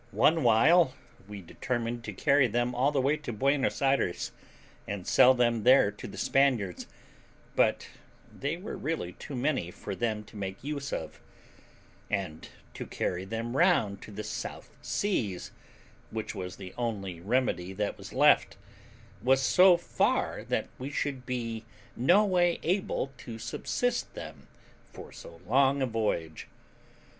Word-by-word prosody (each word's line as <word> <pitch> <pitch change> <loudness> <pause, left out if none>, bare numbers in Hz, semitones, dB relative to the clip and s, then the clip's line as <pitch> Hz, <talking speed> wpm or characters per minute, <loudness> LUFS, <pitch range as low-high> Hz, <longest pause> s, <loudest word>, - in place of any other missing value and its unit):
One 160 +1 +4
while 130 +5 +5 0.3
we 105 -2 -8
determined 120 +5 -3
to 105 - -4
carry 140 +5 +3
them 120 +2 0
all 140 +4 +1
away 140 +3 +2
to 150 -5 -6
Buenos 135 +5 +1
Ayres, 135 -10 +1 0.6
and 100 -3 -4
sell 130 +1 +6
them 120 -2 +2
there 125 -3 +6
to 105 - -9
the - - -10
Spaniards; 125 -10 +1 0.7
but - - +2 0.5
they 145 +4 -3
were 190 +5 -6
really 140 - -3
too 140 - -8
many 130 - 0
for 100 +2 -7
them 110 +1 -2
to 105 - -17
make 95 0 -5
use 140 0 -4
of; 80 - -5 0.9
and 95 -6 -3 0.2
to - - -7
carry 90 +1 -2
them 115 +4 -4
round 100 -6 +3
to - - -10
the 105 +1 -6
South - - -6
Seas, 115 - -2 0.6
which 110 -1 -4
was 90 -3 -6
the 95 -2 -9
only 100 -7 -3
remedy 100 -3 0
that 105 +1 -3
was - - -9
left, - - +4 0.6
was 130 +2 +4
so 180 +6 +6
far 175 - 0
that - - -1
we 130 +2 -4
should 140 -3 -3
be 115 -3 -3 0.3
no 180 - +4
way 175 -3 +2
able 180 -6 -1
to 115 -2 -8
subsist 185 - -2
them - - -9 0.4
for - - -11
so 85 0 -12
long 135 +3 +3
a 135 - +2
voyage. 105 -9 -2
120 Hz, 145 wpm, -29 LUFS, 105-140 Hz, 0.9 s, sell